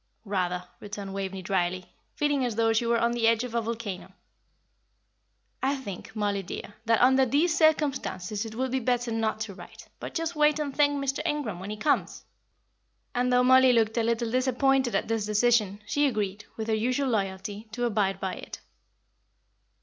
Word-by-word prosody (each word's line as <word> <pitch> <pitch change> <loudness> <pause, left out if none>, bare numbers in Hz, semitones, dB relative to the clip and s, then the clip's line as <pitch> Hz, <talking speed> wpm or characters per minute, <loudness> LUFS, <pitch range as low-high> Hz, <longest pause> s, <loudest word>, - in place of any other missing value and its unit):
"Rather," 180 -3 -1 0.2
returned 200 -1 -7
Waveney, 195 -1 -4
drily, 185 0 -1 0.2
feeling 290 -2 +1
as 240 -3 -1
though 225 0 +2
she 230 +1 +1
were 235 0 +3
on 235 0 +2
the 235 -1 +1
edge 230 +1 +3
of 250 -2 -6
a 235 - +1
volcano. 220 -5 -5 1.5
"I 270 +2 +1
think, 220 -6 -8
Mollie 205 -2 0
dear, 195 +2 -7
that 225 -1 +3
under 260 +2 +5
these 300 +6 +2
circumstances 280 - +1
it 220 -1 -8
would 260 +1 -1
be 265 - +1
better 245 -1 0
not 225 -1 -1
to 215 -2 -4
write, - - -13
but - - -7
just 330 0 -2
wait 300 0 +4
and 290 -3 -3
thank 290 -1 +4
Mr. 275 -1 -1
Ingram 295 - -2
when 190 +2 -7
he 215 - -4
comes." 290 +7 0 0.9
And 250 0 +1
though 250 0 +4
Mollie 260 0 +6
looked 225 -2 +2
a 235 - +2
little 230 0 0
disappointed 260 -1 +2
at - - 0
this 225 -1 0
decision, 210 -2 +2
she 290 +8 +2
agreed, 210 -4 -2
with 220 -1 -4
her 220 - +1
usual 255 +5 0
loyalty, 205 0 -3
to 245 +1 -1
abide 205 -4 0
by 190 - -2
it. - - -8
230 Hz, 180 wpm, -27 LUFS, 205-260 Hz, 1.5 s, Mollie